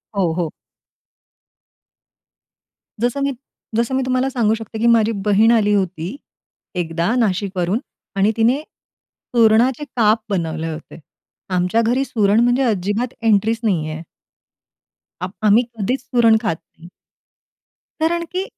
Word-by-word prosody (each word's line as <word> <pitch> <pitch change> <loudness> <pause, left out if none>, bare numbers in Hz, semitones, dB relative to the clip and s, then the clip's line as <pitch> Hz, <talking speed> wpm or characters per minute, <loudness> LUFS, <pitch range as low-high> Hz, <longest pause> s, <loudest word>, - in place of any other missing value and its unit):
हो, 185 -4 +1
हो. 165 -2 -2 2.5
जसं 245 +4 0
मी 280 - +1 0.4
जसं 235 +3 0
मी 265 - +1
तुम्हाला 255 +1 +1
सांगू 235 -5 +1
शकते, 225 0 -8
की 235 - +2
माझी 230 -1 +4
बहीण 210 +2 +4
आली 210 -3 +3
होती. 185 - -1 0.6
एकदा 170 +3 -1
नाशिकवरून 195 -3 0 0.4
आणि 200 +2 +3
तिने 235 +5 +3 0.8
सुरणाचे 235 +4 +4
काप 220 0 +3
बनवले 165 -4 -2
होते. 155 +2 -11 0.5
आमच्या 180 +4 +1
घरी 245 +4 +1
सुरण 210 -3 +2
म्हणजे 245 +3 +3
अजिबात 215 +2 -1
एंट्रीच 225 0 +2
नाहीये. 160 -6 -1 1.2
आप 180 +1 -4
आम्ही 215 +4 +5
कधीच 240 +5 -1
सुरण 235 -4 +3
खात 185 -8 0
नाही. 165 +2 -18 1.1
कारण 340 +2 +1
की 370 +1 -1
220 Hz, 120 wpm, -19 LUFS, 185-240 Hz, 2.5 s, आम्ही